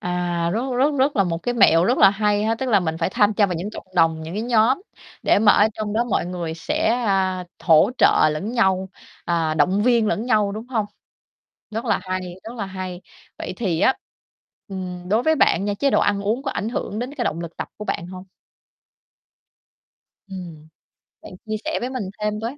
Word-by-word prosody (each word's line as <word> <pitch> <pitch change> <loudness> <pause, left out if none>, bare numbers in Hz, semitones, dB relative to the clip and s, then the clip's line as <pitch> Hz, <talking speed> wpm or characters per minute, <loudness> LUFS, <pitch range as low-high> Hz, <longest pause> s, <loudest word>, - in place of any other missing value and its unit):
À, 175 -1 -1
rất 225 - 0 0.2
rất 285 +3 +2
rất 275 0 +2
là 195 - +4
một 165 -1 -2
cái 245 0 -1
mẹo 170 -6 +5
rất 245 +6 +2
là 195 - +7
hay 210 0 0
ha. 225 +1 +1
Tức 260 +3 -4
là 205 -4 +4
mình 160 -2 -2
phải 170 - 0
tham 205 +2 +2
cha 205 -1 +3
vào 180 - -3
những 185 +6 -4
cộng - - -10
đồng, 165 -2 +2
những, 160 +3 -7
cái, 215 - -2
nhóm 240 - +2 0.4
để - - +4
mà 210 -1 +6
ở 210 - +5
trong 210 -1 -4
đó 235 +2 +1
mọi 215 -6 -1
người 170 -3 -4
sẽ, 165 - -1 0.2
à, 185 -2 0
hỗ 165 +6 +4
trợ - - +5
lẫn 200 +10 -4
nhau, 190 -5 +1 0.4
à, 165 -2 0
động 185 +7 +2
viên 235 -2 +3
lẫn 225 +2 -1
nhau, 210 -4 +2
đúng 220 +3 -7
hông? 220 -5 -1 0.8
Rất 225 +3 -4
là 230 - +1
hay, 185 -1 -3 0.2
rất 230 +2 -8
là 205 -4 -4
hay. 185 -2 -6 0.4
Vậy - - -5
thì 180 -8 -1
á, 265 - +4 0.7
ừm, 180 -2 -6
đối 220 +4 +2
với 315 +3 +3
bạn 195 - +2
nha, 205 0 -1
chế 275 +6 +1
độ - - +3
ăn 200 -1 +1
uống 220 +6 -1
có 275 - -2
ảnh 215 - -3
hưởng 215 -3 -4
đến 250 +4 -5
cái 245 -5 -2
động 165 - -2
lực 170 -1 -8
tập - - -5
của 210 - -7
bạn 170 - -3
hông? 185 +1 -9 2.0
Ừm, 170 -5 -9 0.5
bạn - - -11
chia 215 0 -3
sẻ - - -1
với 245 - -3
mình 255 -4 -4 0.2
thêm 210 0 -2
với. 235 +6 -5
205 Hz, 220 wpm, -22 LUFS, 180-225 Hz, 2.0 s, là